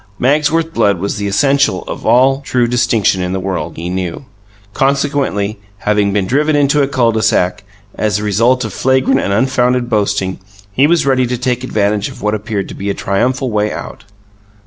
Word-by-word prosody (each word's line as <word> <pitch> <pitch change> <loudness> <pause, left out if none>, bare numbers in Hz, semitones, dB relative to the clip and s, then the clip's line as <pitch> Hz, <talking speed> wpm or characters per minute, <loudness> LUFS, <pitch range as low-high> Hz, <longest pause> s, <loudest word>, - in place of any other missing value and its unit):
Magsworth 155 +5 +1
blood 100 - +2
was 100 +5 -3
the 100 0 -2
essential 135 -1 +2
of - - -7
all 135 +2 +4
true 125 -3 0
distinction 115 -5 +1
in 90 0 -2
the 95 - -1
world, 95 0 -4
he 85 +2 -5
knew. 90 +5 -4 0.5
Consequently, 135 -7 0 0.2
having 105 -1 +1
been 100 -1 0
driven 150 +8 +1
into 145 0 +3
a 140 - +2
cul 125 -4 +2
de 110 -1 -1
sac, 95 0 +1 0.3
as 105 -1 0
a 105 - -4
result 115 +5 +2
of - - -6
flagrant 130 +1 +2
and 100 - -2
unfounded 125 +2 +1
boasting, 100 -3 0 0.3
he 130 +8 +3
was 170 -1 +2
ready 130 -2 +2
to 125 +1 -2
take 125 0 -2
advantage 105 -3 0
of - - -12
what 105 0 0
appeared 105 -1 -3
to - - -7
be 100 +1 -5
a 100 - -1
triumphal 125 +6 -1
way 105 0 0
out. - - -8
115 Hz, 190 wpm, -15 LUFS, 100-135 Hz, 0.5 s, all